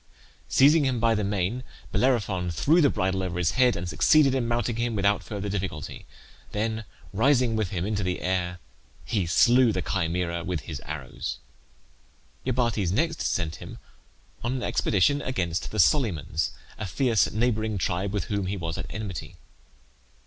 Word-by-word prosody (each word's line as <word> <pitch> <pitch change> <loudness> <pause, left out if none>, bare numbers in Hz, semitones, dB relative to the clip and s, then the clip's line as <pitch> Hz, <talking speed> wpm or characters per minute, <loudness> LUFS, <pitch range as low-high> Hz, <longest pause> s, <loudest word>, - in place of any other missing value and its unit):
Seizing 145 +3 +5
him 130 -3 0
by 115 0 +3
the 105 -1 0
mane 100 +5 -1 0.3
Bellerophon 105 -8 +1
threw 155 - +3
the 145 - +5
bridle 95 -3 0
over 90 -1 -3
his 90 -2 +2
head, 125 -1 +3
and 85 +1 -4
succeeded 135 - +4
in 130 -3 0
mounting 120 -1 -1
him 120 -1 -1
without 100 0 +2
further 105 -1 -5
difficulty; 95 -6 -4 0.5
then 110 +1 -2 0.3
rising 125 +1 +3
with 110 -4 0
him 90 -2 -2
into 105 0 -1
the 90 -1 -1
air 90 -1 -1 0.5
he 100 -7 -1
slew 120 +7 +5
the - - -2
Chimaera 85 -2 -1
with 90 -3 -2
his - - -7
arrows. 75 -3 -5 1.1
Iobates 115 -7 +1
next 160 - 0
sent 85 -4 -1
him - - -9 0.7
on 120 +2 -1
an 130 -2 -3
expedition 125 +9 +2
against 90 -9 -2
the 110 - -6
Solymans, 90 - +2 0.3
a 105 - -3
fierce 115 +4 +2
neighbouring 110 -2 0
tribe 95 +2 -1
with 100 -3 -1
whom 100 +1 -2
he 100 +2 -2
was 85 -2 -4
at - - -5
enmity. 100 -5 -6
105 Hz, 160 wpm, -26 LUFS, 90-120 Hz, 1.1 s, Seizing